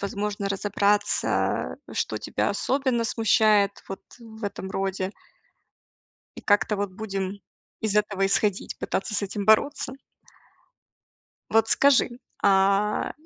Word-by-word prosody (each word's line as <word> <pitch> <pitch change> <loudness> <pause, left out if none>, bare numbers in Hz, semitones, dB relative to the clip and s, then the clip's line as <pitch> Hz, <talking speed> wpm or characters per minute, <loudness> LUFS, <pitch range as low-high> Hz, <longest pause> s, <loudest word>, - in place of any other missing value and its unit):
возможно, 200 0 -3
разобраться, 205 +1 0 0.2
что - - -2
тебя - - -1
особенно 260 -3 0
смущает 215 -3 +3
вот 195 - -6 0.2
в 225 -1 -13
этом 190 -1 -5
роде. 195 0 -2 1.2
И - - -7
как-то 205 0 +2
вот 200 -1 -2
будем 195 -1 -4 0.4
из 210 -1 0
этого 200 -2 +1
исходить, 200 0 0
пытаться 195 +2 -3
с 205 - 0
этим 200 +1 -3
бороться. 235 +6 +3 1.6
Вот 225 0 +3
скажи, 260 -3 +3 0.2
а, 200 +1 +2
205 Hz, 110 wpm, -25 LUFS, 195-220 Hz, 1.6 s, смущает